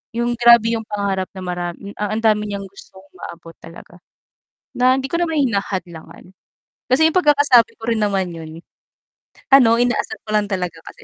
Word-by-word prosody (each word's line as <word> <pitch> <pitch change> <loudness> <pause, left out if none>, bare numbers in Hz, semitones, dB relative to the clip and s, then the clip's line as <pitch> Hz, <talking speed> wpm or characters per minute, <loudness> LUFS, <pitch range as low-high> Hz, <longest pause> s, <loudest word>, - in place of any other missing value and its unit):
'Yong 240 0 -1
grabe 235 -1 +6
'yong 225 -1 -5
pangarap 200 -2 -2
na 190 - -9
maram 175 -1 -4 0.3
a 210 0 -2
ang 220 - -2
dami 210 -1 +2
niyang 200 - -4
gustong 190 0 -16 0.2
maabot 165 0 -11
talaga, 165 +1 -14 0.8
na 255 +1 +3
hindi 270 - -3
ko 335 - -1
naman 325 -2 -1
hinahadlangan 190 -5 -5 0.7
kasi 320 +5 +4
'yong 320 - -5
pagkakasabi 285 -7 +4
ko - - -25
rin 220 - -1
naman 195 -3 -1
'yon 160 0 -10 0.9
ano, 230 -4 +6
inaasar 245 0 -1
ko 215 - -7
lang 210 -1 +1
talaga 180 -4 -4
kasi - - -13
210 Hz, 170 wpm, -19 LUFS, 185-240 Hz, 0.9 s, grabe